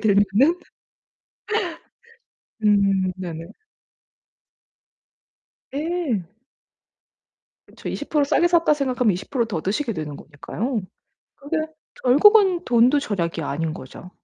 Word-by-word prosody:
들면은 210 - +3 2.1
음 195 -2 +3
네네. 170 -3 -6 2.3
네. 300 - -2 1.4
그쵸. - - -10
'20% 300 -2 -1
싸게 330 +4 +3
샀다.' 335 -3 +3
생각하면 255 -6 +1
20% 235 +7 -2
더 190 -8 -4
드시게 230 - -1
되는 155 -4 -5
거니까요. 210 - -4 0.6
그게 290 +3 -3 0.4
결국은 370 - +5
돈도 245 +4 +4
절약이 170 - -2
아닌 155 +2 -2
거죠. 150 +7 -11
230 Hz, 175 characters per minute, -22 LUFS, 185-290 Hz, 2.3 s, 결국은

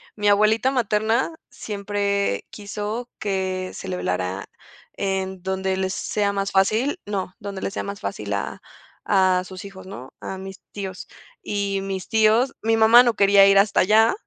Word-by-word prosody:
mi 210 -1 -1
abuelita 215 +4 +4
materna 230 +4 +1
siempre 200 - -2
quiso 210 +3 -5
que 190 -3 -2
se - - -8
le 185 -1 -3
velara 90 - -2 0.5
en 190 -1 -2
donde 190 0 -1
les 190 0 -1
sea 205 +1 -1
más 195 0 -2
fácil, 220 - +2
no, 195 -3 -3
donde 200 -3 -6
les - - -3
sea - - -3
más 200 0 -6
fácil - - -4
a - - -4 0.4
a 185 -2 +3
sus 185 +1 -9
hijos 190 -1 -11
¿no? 135 -9 -10
A 190 - -6
mis 190 0 -9
tíos. 190 -2 -6 0.3
Y 200 - -2
mis 195 -1 -5
tíos, 220 +4 +3
mi 225 0 +2
mamá 225 +2 +8
no 240 -2 +2
quería 200 0 +6
ir 195 0 +5
hasta 200 0 +4
allá, 220 +4 +5
200 Hz, 165 wpm, -23 LUFS, 190-215 Hz, 0.5 s, mamá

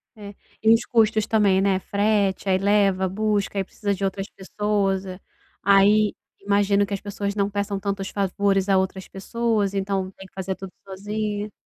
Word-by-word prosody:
É, 205 -2 -10 0.3
e 220 +1 +6
os 230 - +1
custos 220 -2 +2
também, 200 -4 +3
né, 195 -1 +2
frete, 200 -1 0
aí 185 - +4
leva, 195 -1 +2
busca, 205 +1 -1
aí 195 - +1
precisa 200 +2 -3
de 195 0 -5
outras 195 0 -2
pessoas, 195 -1 -1
eh. 185 -1 -8 0.4
Aí 205 +2 +5 0.3
imagino 200 0 +2
que 200 - -6
as 195 - -2
pessoas 200 0 -4
não 200 -1 0
peçam 200 -1 -2
tantos 195 0 -3
favores 195 0 0
a 195 -1 +4
outras 190 0 -2
pessoas, 215 0 -1
então 195 -1 -2
tem 190 0 -13
que - - -34
fazer 190 0 -4
tudo 190 -1 -10
sozinha. 205 +2 -4
200 Hz, 175 wpm, -23 LUFS, 195-205 Hz, 0.4 s, e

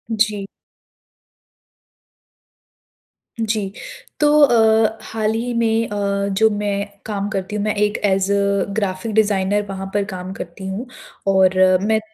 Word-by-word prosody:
जी। 210 -2 0 3.0
जी, 215 -3 -1 0.5
तो 295 - +4
अ, 225 -4 +4
हाल 220 -1 -2
ही 240 +2 -2
में 230 -1 +1
अ, 200 -1 -1
जो 220 0 +5
मैं 205 -1 -2 0.2
काम 205 -2 -3
करती 195 0 -4
हूँ 205 - -1
मैं 215 0 0
एक 210 0 +1
एज़ 195 0 +1
अ 200 -1 +1
ग्राफिक 200 0 -2
डिज़ाइनर 205 -1 +2
वहाँ 195 0 -5
पर 205 - +1
काम 185 -2 -6
करती 185 0 -8
हूँ। 205 +7 -5 0.4
और 190 -1 +4 0.3
मैं 220 +1 +2
205 Hz, 130 wpm, -20 LUFS, 195-220 Hz, 3.0 s, जो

